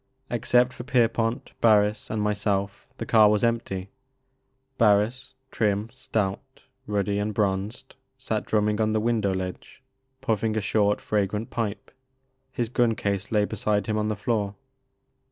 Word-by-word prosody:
Except 125 +1 +2
for 120 - -8
Pierpont, 115 -1 0
Barris, 105 -1 +3
and 105 -1 -1
myself, 100 -1 -1
the - - -4
car 110 -2 +6
was 105 +1 +1
empty. 100 -5 -1 0.9
Barris, 115 +5 +2 0.2
trim, 105 0 0
stout, 105 -6 -3 0.2
ruddy, 100 -1 0
and 105 0 -2
bronzed, 100 +2 -2 0.2
sat 110 -5 -2
drumming 105 0 +1
on 110 0 +1
the 110 - +2
window 110 -3 +1
ledge, 95 +6 -6 0.4
puffing 110 -1 0
a - - +3
short 105 0 +1
fragrant 105 +1 -1
pipe. 110 -3 -3 0.6
His 120 -2 -2
gun 120 -1 +2
case 100 +1 -2
lay 105 -2 +3
beside 105 0 -1
him 110 -1 -1
on 105 - 0
the 105 - -1
floor. 105 -2 -1
105 Hz, 140 wpm, -25 LUFS, 100-115 Hz, 0.9 s, car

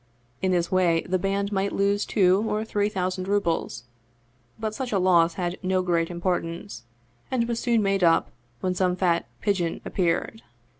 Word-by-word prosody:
In 190 - +1
this 175 -1 0
way 175 -3 +3
the 185 0 0
band 200 +2 -1
might 200 0 0
lose 200 +1 +1
two 190 0 +3
or 215 +1 -1
three 205 -1 0
thousand 185 -1 -2
rubles, 170 - -1 0.8
but 220 -1 -2
such 255 +2 -4
a 205 - +2
loss 170 -3 +4
had 175 -1 -3
no 185 -1 +1
great 170 -2 +1
importance, 170 -9 -3 0.4
and 235 -3 0
was 235 -1 -2
soon 235 -3 +2
made 195 -1 +1
up 165 -1 +3 0.3
when 185 -1 0
some 180 0 +1
fat 175 -2 +1
" - - -37
pigeon 185 -5 0
" - - -30
appeared. 180 +5 -1
185 Hz, 180 wpm, -25 LUFS, 175-200 Hz, 0.8 s, loss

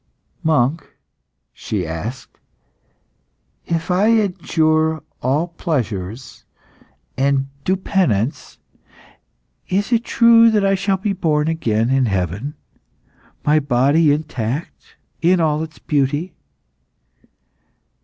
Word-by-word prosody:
"Monk," 155 -2 0 0.6
she 100 -5 -4
asked, 105 +12 -7 1.3
"if 165 +1 -2
I 190 +4 +3
adjure 160 -7 +1 0.2
all 145 +7 0
pleasures 120 - -4 0.7
and 135 0 +1 0.2
do 190 - +2
penance, 145 - -1 1.1
is 200 +5 0
it 235 -1 +2
true 230 -1 +5
that 210 -3 +2
I 195 - +3
shall 195 0 0
be 200 +1 -2
born 155 -5 0
again 120 -8 0
in 135 -2 +2
heaven, 100 - -2 0.9
my 150 +1 +4
body 145 +3 +3
intact 145 -2 -4 0.3
in 180 +2 +3
all 155 -2 +1
its 160 0 -7
beauty?" 145 +4 -1
155 Hz, 95 wpm, -19 LUFS, 130-180 Hz, 1.3 s, true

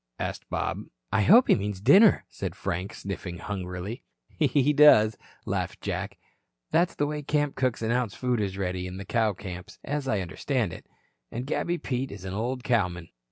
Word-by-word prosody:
asked - - -5
Bob. - - -2 0.3
"I 110 +1 +3
hope 230 - +7
he - - +6
means 100 -2 -2
dinner," 145 - +6
said 90 - -5
Frank, 90 +3 -3
sniffing 95 -2 -6
hungrily. 95 +4 -5 0.3
"He 145 -1 +2
does," 110 -8 +7 0.3
laughed - - -2
Jack. - - -4 0.5
"That's 170 +2 +2
the 145 - +1
way 150 0 -3
camp 145 0 0
cooks 130 -3 -1
announce 120 -1 0
food 125 -3 0
is 95 -2 -2
ready 90 -1 -2
in 90 +1 -7
the 95 - -7
cow 110 0 +1
camps, 90 -1 -8
as 145 -1 -3
I 105 -6 +1
understand 105 - -2
it. - - -11 0.4
And 120 +3 -4
Gabby 170 +4 -1
Pete 130 -3 -3
is 100 -2 -9
an 95 - -4
old 120 +5 -2
cowman." 90 -9 0
110 Hz, 175 wpm, -27 LUFS, 95-135 Hz, 0.5 s, hope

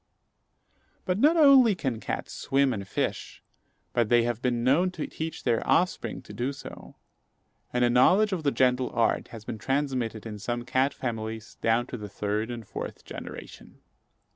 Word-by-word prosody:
But 185 +1 0
not 310 +7 +5
only 270 -8 +7
can 130 -9 -2
cats - - -4
swim 135 -1 +1
and 100 -3 -5
fish, - - -3 0.5
but 120 -3 +1
they 120 -1 +5
have 120 -1 -2
been 120 -2 0
known 150 +9 +3
to 160 - -4
teach 160 0 -6
their 120 -3 +1
offspring 180 +2 +1
to - - -11
do 130 +3 -2
so; - - -11 0.8
and 125 0 +2
a - - +3
knowledge 190 - +4
of 180 - -2
the 145 - +2
gentle 130 -1 +2
art 115 -1 +1
has 110 -2 -11
been 110 - -5
transmitted 130 -4 -1
in 105 -2 -6
some 120 +3 -3
cat 130 +2 +1
families 110 -2 -5
down 115 +2 +2
to 125 - -7
the 105 -2 -7
third 105 +3 -2
and 115 -4 -6
fourth - - -7
generation. - - -10
125 Hz, 170 wpm, -27 LUFS, 115-145 Hz, 0.8 s, only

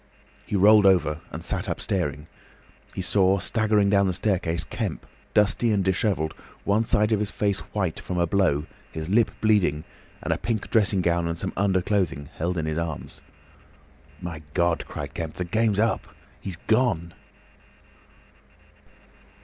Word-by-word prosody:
He - - -2
rolled 105 +1 +6
over 80 -5 +3
and - - -6
sat - - -2
up - - -2
staring. 75 -6 -2 0.7
He 95 - -2
saw, 95 +1 +3
staggering 105 0 +2
down 100 -1 +4
the 95 - 0
staircase, 90 -4 0
Kemp, 105 -6 -4 0.3
dusty 105 +2 +3
and 100 -2 +2
disheveled, 95 -4 0 0.3
one 105 +3 +2
side 105 0 +2
of 110 - +3
his 105 -1 -1
face 100 -1 0
white 95 -6 -1
from 90 - -4
a 85 - +3
blow, 80 -5 +1 0.3
his 80 +1 -5
lip 115 +2 +4
bleeding, 95 -9 +2 0.4
and - - +1
a - - -4
pink 110 -3 -3
dressing 105 -4 +3
gown 85 0 +1
and 85 0 -3
some - - -4
underclothing 95 -6 0
held 85 +2 -2
in 80 - -1
his 80 +1 -1
arms. 85 -3 -5 1.0
"My 85 -3 -6
God!" 85 -2 +1
cried 75 -1 -6
Kemp, 80 -2 -5
"the 90 - -3
game's 110 +2 +1
up! 110 +1 +1 0.3
He's 95 - -6
gone!" 110 -8 +1
95 Hz, 155 wpm, -25 LUFS, 85-105 Hz, 1.0 s, rolled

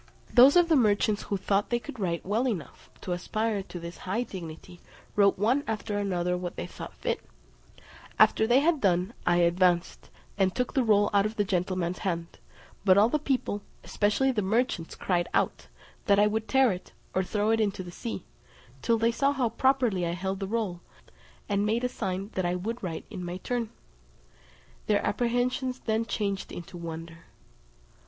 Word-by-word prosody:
Those 260 +4 +8
of 350 -1 +6
the 325 - +4
merchants 210 -4 +3
who 200 - 0
thought 195 +1 0
they 240 - +2
could 235 +1 -9
write 170 -4 -2
well 220 +7 +1
enough 175 - -5
to 180 - -5
aspire 215 +4 -1
to 185 -2 -8
this 170 +1 -8
high 200 +6 -1
dignity, 175 -3 -9 0.4
wrote 200 -1 +4
one 240 +8 +2
after 210 -1 -2
another 180 -3 0
what 180 -1 -5
they - - -4
thought - - -9
fit. - - -2 1.0
After 220 - +5
they 245 +4 +5
had 315 -1 +2
done, 185 +2 +2
I 175 - +5
advanced, 175 0 +2 0.3
and 190 -1 +2
took 250 -1 -1
the 265 - +2
roll 205 -2 +3
out 200 +1 +4
of 215 - -8
the 205 - +2
gentleman's 185 -2 -1
hand; 170 -3 -3 0.4
but 190 -1 +5
all 210 +3 +6
the 300 - +1
people, 260 -7 -1 0.2
especially 215 +6 +1
the 220 -5 0
merchants, 210 -4 0
cried 175 -2 0
out, - - 0 0.4
that 200 -2 +5
I 205 - +6
would 220 +1 -1
tear 265 -3 +4
it, 180 -1 -7 0.2
or 190 - +1
throw 210 +3 0
it 225 - +2
into 200 -3 -1
the 175 - -9
sea, 225 +1 -6 0.6
till 230 - +2
they 230 +1 +2
saw 275 +4 +2
how 255 -4 +1
properly 245 -5 +2
I 170 - -1
held 190 +2 -3
the 195 - -3
roll, 200 -5 -2 0.7
and 200 -1 +1
made 225 +3 0
a - - +3
sign 195 -4 -3
that 185 - -1
I 175 0 0
would 225 +7 -4
write 170 -4 -5
in 190 -4 -6
my 175 +1 -4
turn: 235 +3 -2 1.2
their 210 -1 +2
apprehensions 245 +3 0
then 225 0 0
changed 200 -4 -2
into 175 +1 -8
wonder. 165 0 -7
205 Hz, 185 wpm, -28 LUFS, 180-230 Hz, 1.2 s, Those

